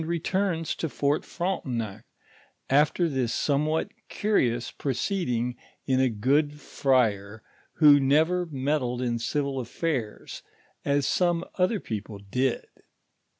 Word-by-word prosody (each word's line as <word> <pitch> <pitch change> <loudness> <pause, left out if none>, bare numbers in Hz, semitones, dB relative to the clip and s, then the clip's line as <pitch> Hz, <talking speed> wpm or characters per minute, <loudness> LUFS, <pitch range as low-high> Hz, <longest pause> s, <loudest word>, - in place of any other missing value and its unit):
rns 170 0 -1
to 165 - -3
Fort 145 +1 0
Frontennc, 120 - -3 0.7
after 150 +5 +3
this 130 -6 -1
somewhat 150 +2 0 0.2
curious 120 - 0
proceeding 125 - -1 0.3
in 130 -1 +2
a 130 -1 +3
good 145 +7 +1
friar 110 -7 0 0.3
who 145 -2 +7
never 160 +6 +2
meddled 135 -4 -1
in 120 -1 -1
civil 140 +2 -1
affairs, 125 -2 -3 0.4
as 140 -1 +1
some 175 +1 +1
other 190 +4 +2
people 105 - -6
did. 120 +6 -1
140 Hz, 110 wpm, -27 LUFS, 120-160 Hz, 0.7 s, who